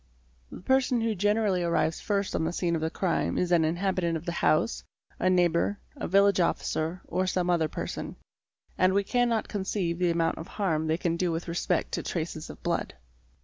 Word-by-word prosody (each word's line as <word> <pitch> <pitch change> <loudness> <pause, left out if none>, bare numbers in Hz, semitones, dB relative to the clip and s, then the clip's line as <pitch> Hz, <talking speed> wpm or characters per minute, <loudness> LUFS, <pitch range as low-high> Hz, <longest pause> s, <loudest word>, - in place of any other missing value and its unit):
The - - -9
person 255 +2 +2
who 225 -1 +1
generally 205 -1 +1
arrives 160 -2 0
first 200 -2 -1
on - - 0
the 160 - 0
scene 175 -1 0
of 160 - -2
the 160 - 0
crime 180 +1 -1
is 180 -1 0
an 170 -2 +5
inhabitant 170 0 0
of 160 - -10
the 170 - -2
house, 80 - +1 0.4
a 185 - +2
neighbour, 180 +2 +2 0.2
a - - -4
village 200 +1 +4
officer, 170 0 -1
or 185 0 -1
some 180 -1 +1
other 165 -3 +2
person, - - -5 0.6
and 185 +1 +4
we 200 - +3
cannot 235 0 +1
conceive 190 -4 -2
the 180 -1 +2
amount 165 -1 0
of 160 - -7
harm 160 -6 -1
they 160 +1 +1
can 170 -1 -1
do 180 0 0
with 165 +2 -3
respect 170 0 -1
to - - -2
traces - - -4
of - - -11
blood. - - -1
175 Hz, 195 wpm, -28 LUFS, 165-200 Hz, 0.6 s, an